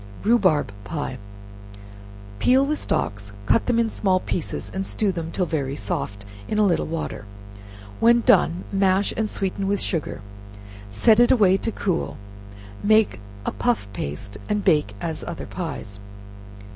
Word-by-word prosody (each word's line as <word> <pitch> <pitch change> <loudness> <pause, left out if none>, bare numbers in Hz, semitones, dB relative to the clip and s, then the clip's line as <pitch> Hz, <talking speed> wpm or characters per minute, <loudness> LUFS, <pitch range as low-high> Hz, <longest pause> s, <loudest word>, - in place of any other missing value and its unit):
Rhubarb 190 - +3
Pie. 145 -4 -4 1.2
Peel 265 +2 +4
the 300 +2 0
stalks, 100 - -2
cut 225 - +2
them 245 -2 +2
in 230 -1 +3
small 190 -4 +1
pieces, 175 -3 -4
and 190 - -2
stew 200 +1 0
them 165 -2 -5
till 185 - 0
very 140 -5 -2
soft 140 - -4 0.2
in 215 - -2
a 210 - +4
little 175 -4 +1
water; 160 -10 -4 0.7
when 235 +1 +5
done, 175 -4 +3
mash 195 0 +2
and 220 -1 -1
sweeten 195 0 -2
with 200 0 +1
sugar; 160 - -2 0.7
set 210 - +4
it 240 - +6
away 200 -6 +5
to 225 - -2
cool; 185 -5 -2 0.7
make 215 - +4 0.3
a - - 0
puff 240 - 0
paste, 100 +6 -5
and 210 -1 0
bake 150 - +2
as 160 -2 -4
other 170 - -5
pies. 135 - -6
185 Hz, 145 wpm, -23 LUFS, 150-215 Hz, 1.2 s, it